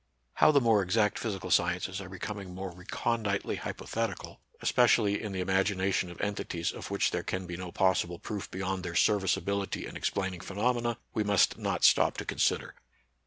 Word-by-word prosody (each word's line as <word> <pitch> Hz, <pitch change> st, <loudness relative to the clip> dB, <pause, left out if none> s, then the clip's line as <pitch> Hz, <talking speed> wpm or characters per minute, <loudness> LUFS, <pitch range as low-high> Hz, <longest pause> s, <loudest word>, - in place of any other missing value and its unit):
How -, -, +5 dB
the 145 Hz, -, +5 dB
more 115 Hz, -5 st, +4 dB
exact 105 Hz, +3 st, +1 dB
physical 95 Hz, -5 st, -4 dB
sciences 90 Hz, +2 st, +1 dB
are 95 Hz, -, -9 dB
becoming 95 Hz, 0 st, -6 dB
more 95 Hz, -1 st, -5 dB
reconditely 100 Hz, +3 st, -2 dB
hypothetical, 115 Hz, -5 st, -4 dB, 0.2 s
espe 125 Hz, -, +4 dB
cially 105 Hz, -3 st, +3 dB
in 105 Hz, -, -4 dB
the 95 Hz, -1 st, -2 dB
imagination 95 Hz, 0 st, +1 dB
of 85 Hz, -, -11 dB
entities 100 Hz, -4 st, -2 dB
of -, -, -8 dB
which -, -, +1 dB
there -, -, -1 dB
can 95 Hz, 0 st, -3 dB
be 85 Hz, 0 st, -5 dB
no 90 Hz, 0 st, -6 dB
possible 90 Hz, -2 st, +1 dB
proof 105 Hz, +2 st, -5 dB
beyond 95 Hz, 0 st, -3 dB
their 85 Hz, 0 st, -5 dB
serviceability 100 Hz, 0 st, +1 dB
in -, -, -9 dB
explaining 95 Hz, -2 st, -2 dB
phenomena, 120 Hz, +3 st, 0 dB, 0.2 s
we 110 Hz, -, +1 dB
must 100 Hz, -2 st, +3 dB
not -, -, -2 dB
stop -, -, +5 dB
to -, -, -4 dB
consider. -, -, 0 dB
95 Hz, 170 wpm, -30 LUFS, 90-105 Hz, 0.2 s, How